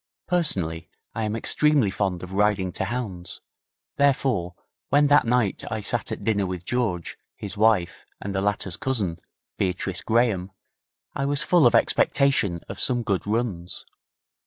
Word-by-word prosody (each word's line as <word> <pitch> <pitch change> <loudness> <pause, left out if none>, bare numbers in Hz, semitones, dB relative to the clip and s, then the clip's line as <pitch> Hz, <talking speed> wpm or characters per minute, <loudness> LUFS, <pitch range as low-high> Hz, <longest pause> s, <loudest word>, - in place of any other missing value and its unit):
Personally, 95 - -1 0.2
I 115 -1 -2
am 105 +1 -2
extremely 140 -2 +3
fond 95 -3 -2
of 90 +1 -8
riding 100 -2 +1
to - - -3
hounds, 105 -8 -5 0.6
therefore, 130 -11 +1 0.3
when 145 +1 +4
that 145 -4 +5
night 120 -4 +1
I 110 - -3
sat 100 - -2
at - - -5
dinner 100 -3 +1
with 90 -1 -5
George, 105 -9 -2 0.2
his 100 -1 -5
wife, 105 -5 +2 0.2
and 100 - -5
the 95 - 0
latter's 100 -3 -1
cousin, 100 -11 -2 0.4
Beatrice 90 0 -1
Graham, 110 -5 +1 0.6
I 140 - -2
was 145 +1 +1
full 170 -6 +5
of 120 - +3
expectation 115 - +2
of - - -7
some 120 -2 +2
good 100 -3 -1
runs. 105 -6 -2
105 Hz, 150 wpm, -24 LUFS, 90-125 Hz, 0.6 s, that